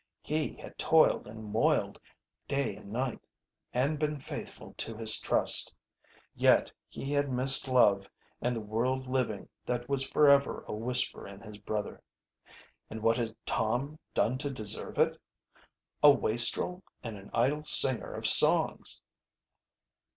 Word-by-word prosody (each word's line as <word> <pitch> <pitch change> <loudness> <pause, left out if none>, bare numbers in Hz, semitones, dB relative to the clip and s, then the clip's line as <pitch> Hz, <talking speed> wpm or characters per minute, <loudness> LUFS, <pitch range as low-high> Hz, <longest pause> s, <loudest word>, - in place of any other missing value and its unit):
He 155 0 -3
had - - -13
toiled 160 -8 +3
and 110 +1 -10
moiled, 105 +2 0 0.5
day 140 0 -2
and 100 - -13
night, 125 +1 -3 0.5
and 140 +5 -1
been 150 -1 -2
faithful 130 - -8
to 115 - -4
his 110 -1 +2
trust. - - +2 0.6
Yet - - +2 0.2
he 135 - -7
had 145 -1 0
missed 135 +2 +5
love 100 -6 +2 0.3
and 125 0 -1
the 115 - -4
world 120 +5 -2
living 125 -6 -3 0.2
that 120 0 -3
was 135 0 -1
forever 140 -2 +3
a - - -5
whisper 115 +1 -1
in 100 0 -12
his 105 -2 -11
brother. 105 0 -5 0.9
And 110 0 -8
what 115 0 +2
had 115 -2 -3
Tom 125 +7 -2 0.2
done 130 +3 0
to 145 0 -3
deserve 110 -6 -2
it? - - +1 0.8
a 150 - +8
wastrel 140 +8 +3 0.2
and 115 -3 -6
an 100 0 -13
idle 135 +6 0
singer 130 -4 +2
of - - -6
songs. - - +4
125 Hz, 140 wpm, -29 LUFS, 110-140 Hz, 0.9 s, a